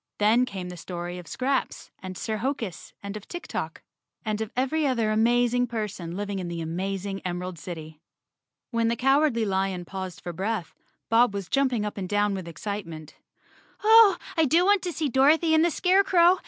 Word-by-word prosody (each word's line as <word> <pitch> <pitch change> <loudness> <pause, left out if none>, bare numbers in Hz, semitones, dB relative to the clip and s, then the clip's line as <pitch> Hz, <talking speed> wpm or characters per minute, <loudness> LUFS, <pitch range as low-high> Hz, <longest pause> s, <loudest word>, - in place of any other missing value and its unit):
Then 220 +4 +4
came 190 -6 -6
the 180 - -8
story 175 +1 -6
of 175 - -11
Scraps 265 - -2
and 185 -2 -7
Sir 220 -1 -2
Hokus 225 - -4
and 200 +1 -5
of 215 - -8
Tik 350 0 -7
Tok, - - -5 0.4
and 215 0 -1
of 220 - -4
every 285 +4 +1
other 230 -5 +1
amazing 240 +2 +3
person 200 -7 -4
living 200 -1 -3
in 180 - -4
the 170 -1 -4
amazing 195 +4 -3
Em¬ 180 -1 -2
erald 180 -2 -6
City. 160 -2 -8 0.7
When 230 -1 +1
the 230 - +1
Cowardly 270 -1 +3
Lion 190 -2 -1
paused 185 -1 -6
for 175 - -6
breath 195 0 -3 0.4
Bob 230 -2 +4
was 195 -3 -4
jumping 255 -6 +1
up 210 -1 -4
and 185 -2 -4
down 205 0 +2
with 190 -3 -5
excitement. 165 -4 -6 0.7
"Oh, 435 -3 +7 0.2
I 320 - +4
do 330 +6 +4
want 405 -1 +4
to 360 - -3
see 315 -2 -1
Dorothy 300 +6 +4
and 315 0 +5
the 345 - +4
Scarecrow! 365 0 +4
215 Hz, 185 wpm, -26 LUFS, 185-270 Hz, 0.7 s, Oh